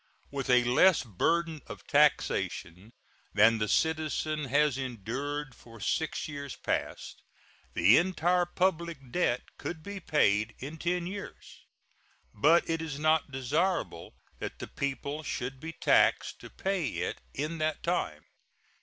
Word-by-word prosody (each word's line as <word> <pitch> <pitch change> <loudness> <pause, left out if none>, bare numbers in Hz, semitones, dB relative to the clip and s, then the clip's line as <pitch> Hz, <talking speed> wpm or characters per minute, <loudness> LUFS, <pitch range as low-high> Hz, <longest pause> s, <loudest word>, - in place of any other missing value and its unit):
With 140 -2 -4
a 125 -1 +6
less 155 +9 +5
burden 160 - 0
of - - -9
taxation 90 +6 +1 0.4
than 110 +2 +6
the 105 - 0
citizen 155 +1 0
has 145 +1 +2
endured 135 +3 -4
for 115 -2 -15
six 155 +9 -1
years 140 -3 -6
past, - - -3 0.5
the 95 +9 +6
entire 175 0 +2
public 170 -7 -1
debt 150 -9 +1 0.2
could 160 -2 -5
be 200 +2 -6
paid 110 - +2
in 145 +5 -7
ten 175 +1 -1
years. 200 +3 -9 0.7
But 155 +11 +4
it 165 0 -1
is 155 -4 -4
not 155 0 +2
desirable 140 - -1 0.2
that - - -5
the - - -6
people 140 +2 -3
should 135 -3 -4
be 165 +3 -6
taxed 165 - +3
to - - -11
pay 190 -6 -1
it - - -3
in 155 +4 -3
that 155 -1 -1
time. - - -1
150 Hz, 135 wpm, -30 LUFS, 125-165 Hz, 0.7 s, a